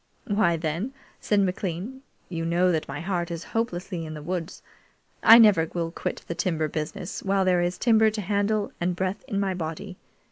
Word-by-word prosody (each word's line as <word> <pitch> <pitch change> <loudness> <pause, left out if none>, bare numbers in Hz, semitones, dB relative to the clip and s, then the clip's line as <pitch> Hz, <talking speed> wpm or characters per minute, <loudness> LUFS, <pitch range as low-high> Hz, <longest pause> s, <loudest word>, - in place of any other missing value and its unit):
"Why, 200 -5 +2
then," 165 - -3 0.3
said 205 -1 +2
McLean, 190 +6 -3 0.3
"you 165 -2 -4
know 175 +2 +2
that 160 -2 -1
my 145 +3 -5
heart 175 -1 -2
is 170 -1 -5
hopelessly 185 -6 -2
in 155 -1 -6
the 150 - -8
woods. 175 0 -4 0.6
I 225 0 +9
never 200 -8 +6
will 165 -1 -1
quit - - -4
the - - -2
timber 165 -2 -1
business 155 +4 -5
while 195 -1 +1
there 180 -1 +3
is 175 +1 -1
timber 220 -2 +4
to 215 0 -4
handle 205 +1 0
and 175 +1 0
breath 190 +3 -2
in 200 - -1
my 195 -1 0
body. 180 +3 -5
180 Hz, 185 wpm, -26 LUFS, 165-200 Hz, 0.6 s, I